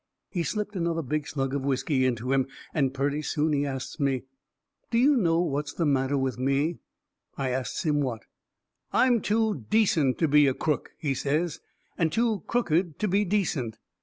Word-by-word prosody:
He 175 - -1
slipped 210 +4 -3
another 170 -2 -1
big 150 +2 -2
slug 135 -2 -2
of 140 - -1
whiskey 135 0 +1
into 125 +1 -2
him, 135 -1 +2 0.3
and 135 -4 +1
purty 140 +2 -1
soon 155 0 0
he 145 0 +1
asts 135 +2 -5
me: 135 -3 +1 0.7
"Do 230 - +1
you 275 +5 +5
know 170 -8 +3
what's 145 -3 -2
the 170 - -1
matter 140 -1 +2
with 130 -2 -1
me?" 140 +5 +1 0.6
I 135 -1 -1
asts 130 +6 -2
him 150 -3 +2
what. 120 -6 -3 0.7
"I'm 245 -3 +4
too 215 - 0
decent 165 - +3
to 160 - +2
be 150 0 +5
a 130 - +1
crook," 150 -3 -1
he 145 -3 -1
says, 150 +5 -1 0.4
"and 165 -2 +2
too 225 -1 +1
crooked 175 - +1
to 215 - 0
be 200 +2 +2
decent. 165 - -1
150 Hz, 180 wpm, -27 LUFS, 135-175 Hz, 0.7 s, you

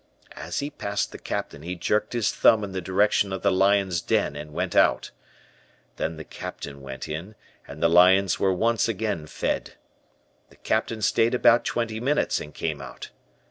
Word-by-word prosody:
As - - -4
he 145 +1 -4
passed 100 -7 -3
the - - -9
Captain 75 - -5
he 90 +3 -5
jerked 105 +7 -1
his 120 -3 +1
thumb 110 -2 +4
in 100 - -5
the 95 0 -4
direction 100 +2 +2
of 95 - -4
the 100 - +3
lion's 95 -2 +2
den 80 - 0
and 75 +1 -8
went 90 +3 -3
out. - - +3 0.9
Then 80 0 -3
the 80 - -7
Captain 70 -2 -8
went 65 +1 -7
in, 85 +8 -6 0.3
and 75 +3 -8
the - - +6
lions 90 +3 +5
were 95 - +2
once 115 +6 +1
again 105 -7 -2
fed. - - -3 0.8
The - - -20
Captain 110 0 -2
stayed 115 +4 +2
about 120 -1 +4
twenty 115 -2 -2
minutes 145 +5 0
and 75 - -8
came 75 -2 -4
out. 65 -2 -9
95 Hz, 180 wpm, -25 LUFS, 80-110 Hz, 0.9 s, the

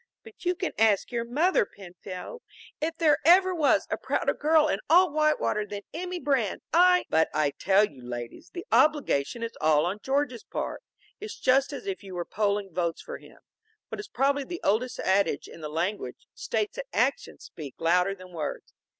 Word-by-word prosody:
But 440 -4 -15
you 360 +1 +2
can 370 0 -3
ask 220 -1 +3
your 235 -1 -1
mother, 295 - +2
Penfield, 190 - -9 0.4
if 325 +1 -2
there 310 -3 +3
ever 370 +4 +6
was 315 -5 +2
a - - 0
prouder - - 0
girl 310 +1 +3
in 200 - 0
all 360 +1 +6
Whitewater 305 -8 +1
than 205 -1 -7
Emmy 360 +2 -4
Brand. 265 - 0
I 360 +1 +5
" - - -65
"But 160 0 +3
I 150 -2 +2
tell 195 +7 +3
you, 135 -7 -16
ladies, 120 -1 -7
the 350 +1 -7
obligation 245 - +2
is 230 - -5
all 155 0 +4
on 190 +4 -2
George's 270 -3 -1
part. - - -5 0.4
It's 425 +1 -8
just 265 +3 +3
as 285 - -7
if 390 -1 -4
you 190 -3 -9
were 175 -1 -3
polling 200 -3 -1
votes 170 -1 -2
for - - -7
him. - - -17 0.5
What - - -6
is 415 - -6
probably 275 +2 +1
the 345 +5 -7
oldest 235 +5 0
adage 195 +1 +1
in - - -12
the 150 - -5
language, 165 -4 -3
states 215 -2 -3
that - - -5
actions - - -1
speak 145 -5 -9
louder 180 +4 +2
than 185 -1 -14
words. 155 -3 -5
230 Hz, 190 wpm, -27 LUFS, -, 0.5 s, ever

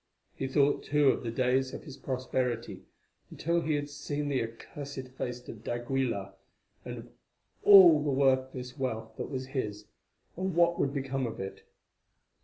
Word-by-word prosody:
He 135 - -3
thought, 140 +1 +3
too, 145 -1 +3
of - - +1
the 120 - -4
days 130 +2 +1
of - - -8
his 145 -4 -9
prosperity 125 -6 -3 0.4
until 170 +1 0
he 155 -1 0
had 145 0 -2
seen 145 0 -4
the 135 -2 +1
accursed 130 +4 -7
face 125 -1 -5
of 110 -1 -9
d'Aguilar, 120 -4 -2 0.5
and - - -6
of - - -11 0.5
all 180 -7 +9
the 150 - 0
worthless 130 -1 +1
wealth 110 -4 -3
that - - -4
was 130 -1 -4
his, 105 -6 -3 0.5
and 185 0 -2
what 170 0 +3
would 140 - +1
become 135 -2 -2
of 115 - -7
it. 95 0 -6
130 Hz, 160 wpm, -30 LUFS, 125-145 Hz, 0.5 s, all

